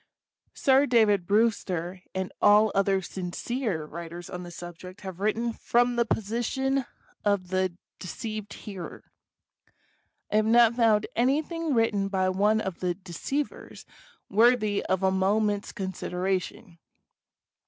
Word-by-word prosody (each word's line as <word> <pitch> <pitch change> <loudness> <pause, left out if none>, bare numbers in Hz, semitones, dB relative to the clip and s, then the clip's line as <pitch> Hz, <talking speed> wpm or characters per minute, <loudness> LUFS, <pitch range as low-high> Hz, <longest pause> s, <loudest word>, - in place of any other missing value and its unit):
Sir 275 -1 +4
David 210 -7 +3
Brewster 190 -5 0
and 190 0 -3
all 210 +1 +6
other 195 -1 +2
sincere 185 - -3
writers 170 +2 -8
on 180 - -5
the 175 - -8
subject 175 +2 -10
have 190 -2 -7
written 225 +3 0
from 245 +2 +1
the 235 -1 +1
position 240 +6 -1 0.4
of 200 -3 +1
the 185 -2 0 0.2
de - - -7
ceived 215 +2 -5
hearer. 190 -5 -9 1.2
I 210 - +3
have 215 - +3
not 235 0 +6
found 225 -3 +3
anything 300 +5 +1
written 210 -4 +2
by 190 -1 +1
one 205 +4 +2
of 190 -4 -4
the 180 -1 -1
deceivers 195 - -5 0.4
worthy 215 -1 +3
of 190 0 0
a 190 - +4
moment's 205 +2 +1
consideration. 185 -1 -3
205 Hz, 125 wpm, -27 LUFS, 185-230 Hz, 1.2 s, all